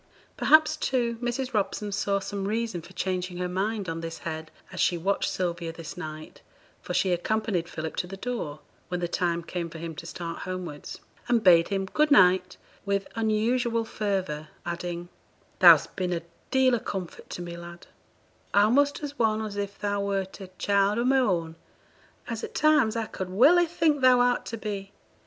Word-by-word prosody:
Perhaps, 315 0 +5
too, 235 -3 0
Mrs. 250 +1 -2
Robson 205 0 -1
saw 200 0 0
some 195 0 -4
reason 220 -4 -2
for 160 - -14
changing 185 -1 -2
her 180 0 -1
mind 195 +2 -2
on 165 0 -3
this 165 0 -5
head 160 -1 -6 0.2
as - - -7
she 175 - +2
watched 195 +4 0
Sylvia 170 -2 -2
this 165 -1 -8
night, 155 -2 -8 0.4
for - - -4
she 190 - +2
accompanied 180 -1 0
Philip 160 0 -5
to 180 - -1
the 195 +2 -8
door, 190 -11 -4 0.3
when 180 -1 -3
the 175 - -1
time 170 -1 -1
came 170 0 -4
for 165 - -9
him 165 0 -5
to 170 - -7
start 170 0 -6
homewards, 180 -5 -6 0.3
and 235 -2 +2
bade 170 -3 +6
him 195 -1 -1
'good 300 +10 +1
night' 185 -6 +5 0.3
with 200 -1 -1
unusual 230 +1 +1
fervour, 190 -9 -2 0.2
adding 175 0 -4 0.5
'Thou'st - - +7
been 180 -2 -1
a 170 - -3 0.3
deal 265 -1 +4
o' - - -1
comfort 190 -5 -6
to 175 - -5
me, 170 0 -6
lad 170 0 -10 0.7
a'most 275 +9 +4
as 290 0 -6
one 220 -2 +2
as 210 -2 -5
if 200 0 -4
thou 205 -1 -1
wert 195 -1 -2
a 190 - -7
child 200 +1 +2
o' 235 - +1
my 265 +2 +4
own, 170 -9 0 0.7
as 230 -2 -4
at - - -6
times 300 -8 +4
I 225 -1 -1
could 190 -3 -6
welly 300 - +5
think 320 -4 +1
thou 255 -1 +6
art 245 0 +2
to 230 - -4
be. 200 -2 -5
195 Hz, 185 wpm, -27 LUFS, 175-230 Hz, 0.7 s, Thou'st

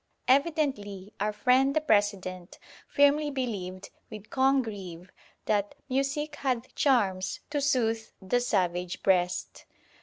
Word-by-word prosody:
Evidently 260 - 0
our 210 +1 0
friend 260 +5 +3
the - - +4
President 200 - 0 0.3
firmly 290 +1 +3
believed, 200 -9 -4 0.2
with 215 -1 -10
Congreve, 210 -10 0 0.3
that 205 +4 0
"Music 280 +3 -1
hath 255 -2 -2
charms 195 -9 +1
to 290 -1 0
soothe 230 -5 +1
the 195 +6 0
savage 180 -6 -1
breast." 180 -1 0
225 Hz, 110 wpm, -28 LUFS, 190-275 Hz, 0.3 s, the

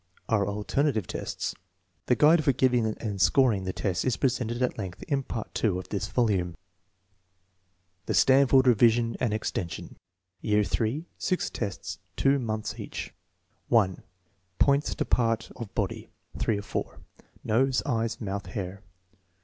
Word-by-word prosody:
are 105 -3 +2
alternative 110 - 0
tests. - - -4 0.5
The 125 - +4
guide 155 +6 +5
for 140 - +3
giving 125 -3 +2
and 105 -2 -3
scoring 115 -8 +4
the 95 - -1
tests 90 -2 -1
is 130 -3 0
presented 120 -3 0
at 125 - 0
length 95 -3 -6
in 140 -3 0
Part 115 -4 -5
II 100 -5 +2
of 90 - -7
this 100 0 -2
volume. 95 -8 0 1.5
The - - 0
Stanford 135 0 +5
revision 115 -1 +4
and 125 -4 +1
extension 100 -5 -4 0.4
Year 105 -1 +2
IIL 115 +10 -1
(6 185 - 0
tests, 100 -6 -4 0.2
2 140 +1 +3
months 110 -3 -3
each.) - - -6 0.5
1. 100 -6 +2 0.6
Points 140 +1 +3
to - - -1
parts 115 -2 +1
of 115 -5 -7
body. 100 -4 -2 0.3
(3 110 - +1
of 100 - -6
4.) - - -4 0.4
Nose; 130 +4 +2
eyes; 115 -1 -1
mouth; 100 -3 -4
hair. 95 +1 -5
115 Hz, 140 wpm, -27 LUFS, 100-130 Hz, 1.5 s, guide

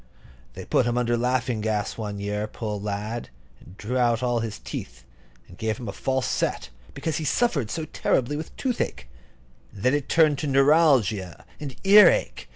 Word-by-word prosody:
They - - -8
put - - +2
him 120 0 0
under 120 -1 +1
laughing 125 -1 0
gas 105 -1 -1
one 105 -2 -5
year, 105 +1 -2
poor 105 -2 -5
lad, 105 +3 -4 0.3
and 95 - -16
drew 125 +5 -2
all 120 0 +1
his 110 -2 -4
teeth, - - -8 0.4
and 90 - -16
gave 110 -1 -1
him 120 - -7
a - - -3
false 130 +5 -1
set, - - -2 0.2
because 160 -2 -2
he 160 - -3
suffered 145 - +1
so 160 +4 -3
terribly 135 -2 0
with 155 +2 -7
toothache; 145 - -2 0.6
and 100 - -11
then 130 - +3
it 145 -2 -1
turned 155 -4 +4
to 150 - -2
neuralgia 135 - +3
and 145 -3 -6
ear 200 -1 +9
ache. 65 - -2
120 Hz, 175 wpm, -25 LUFS, 105-145 Hz, 0.6 s, ear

